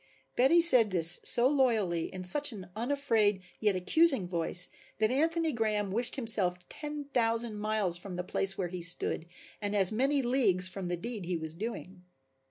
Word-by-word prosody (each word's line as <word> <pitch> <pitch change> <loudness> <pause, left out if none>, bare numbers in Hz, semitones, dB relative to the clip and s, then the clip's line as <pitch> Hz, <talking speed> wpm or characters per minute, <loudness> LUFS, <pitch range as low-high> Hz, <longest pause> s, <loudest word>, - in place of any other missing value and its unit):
Betty 295 +8 +3
said 250 -10 +7
this 175 -2 +4
so 240 +1 +2
loyally 225 - 0
and - - -11
in 185 - -7
such 290 +10 +3
an 190 -5 -11
unafraid, 225 -5 -1 0.2
yet 210 -3 0
accusing 260 - +1
voice, 175 0 +2 0.3
that 215 +1 0
Anthony 325 +3 -1
Graham 210 -3 -2
wished 235 +4 -1
himself 215 -8 +4
ten 295 -1 -7
thousand 230 -2 -1
miles 210 -5 0
from 185 0 -8
the 180 - -5
place 195 +1 -2
where 180 -3 -4
he 180 0 -7
stood 170 -1 -2 0.3
and 205 0 -4
as 195 -1 +4
many 270 +5 -1
leagues 220 -8 +1
from 185 -1 -5
the 175 0 -4
deed 220 0 -7
he 175 0 -3
was 160 -1 -3
doing. 190 -1 -8
210 Hz, 180 wpm, -29 LUFS, 180-250 Hz, 0.3 s, said